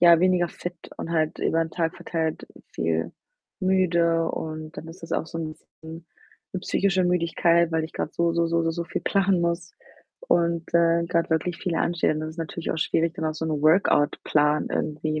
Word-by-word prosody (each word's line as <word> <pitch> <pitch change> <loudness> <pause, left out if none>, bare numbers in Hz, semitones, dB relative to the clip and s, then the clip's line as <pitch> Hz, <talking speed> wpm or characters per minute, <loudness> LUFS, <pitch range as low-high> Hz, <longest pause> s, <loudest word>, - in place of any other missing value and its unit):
ja, 170 -1 +7
weniger 180 -2 +3
fit 175 +1 -7 0.2
und 165 - -5
halt 155 -1 0
über 165 - +1
den 160 - -8
Tag 165 +1 -1
verteilt 165 -3 -3 0.3
viel 80 0 -1 0.5
müde 170 -3 +2
und 155 0 -6
dann 160 - -7
ist 165 +2 -12
das 165 - -7
auch - - 0
so 165 - -6
'n 160 -1 -4
bisschen - - -22 0.9
'ne 185 - -2
psychische 190 -1 +1
Müdigkeit, 170 -1 +2
weil 160 -1 +1
ich 160 - -9
grad 150 - -3
so, 170 0 +1
so, 170 0 +2
so, 170 0 +1
so, 165 - +1
so 170 0 -3
viel - - -4
planen 195 -2 +2
muss 170 0 -2 0.6
und, 170 -1 +2
äh, 170 0 +4
grad 170 0 0
wirklich 160 +2 0
viel 180 -3 -2
ansteht. 170 -2 +1
Und 155 - -3
das 155 0 -4
ist 160 - -13
natürlich 165 +1 -4
auch 160 - -3
schwierig, 165 +1 +1
dann 160 - -2
auch 155 - -2
so 160 +1 -4
'n 155 -2 -1
Workout-Plan 150 -2 +3
irgendwie 155 0 -2
165 Hz, 200 wpm, -25 LUFS, 160-170 Hz, 0.9 s, ja